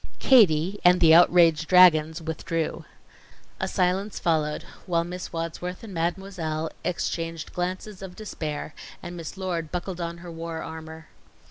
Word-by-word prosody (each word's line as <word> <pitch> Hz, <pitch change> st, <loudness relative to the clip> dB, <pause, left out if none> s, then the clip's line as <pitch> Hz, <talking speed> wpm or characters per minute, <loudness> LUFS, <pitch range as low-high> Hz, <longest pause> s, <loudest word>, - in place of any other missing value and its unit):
Katie 195 Hz, -, +4 dB
and 180 Hz, 0 st, +6 dB
the 160 Hz, -1 st, +6 dB
outraged 165 Hz, -2 st, +5 dB
dragons 160 Hz, -3 st, +5 dB
withdrew. 160 Hz, 0 st, -3 dB, 0.7 s
A -, -, -1 dB
silence 190 Hz, +2 st, 0 dB
followed, 155 Hz, -2 st, 0 dB, 0.2 s
while 170 Hz, -2 st, +1 dB
Miss 180 Hz, +1 st, -7 dB
Wadsworth 170 Hz, +4 st, -5 dB
and 215 Hz, -4 st, -9 dB
Mademoiselle 165 Hz, -2 st, -3 dB
exchanged 165 Hz, -2 st, -3 dB
glances 185 Hz, +3 st, -4 dB
of 185 Hz, -2 st, -8 dB
despair, 155 Hz, -8 st, -5 dB, 0.3 s
and 175 Hz, -, -7 dB
Miss 165 Hz, +2 st, -7 dB
Lord 175 Hz, -4 st, -3 dB
buckled 180 Hz, 0 st, -4 dB
on 170 Hz, 0 st, -4 dB
her 170 Hz, -, -7 dB
war 165 Hz, 0 st, -6 dB
armor. 160 Hz, 0 st, -9 dB
170 Hz, 135 wpm, -25 LUFS, 160-180 Hz, 0.7 s, and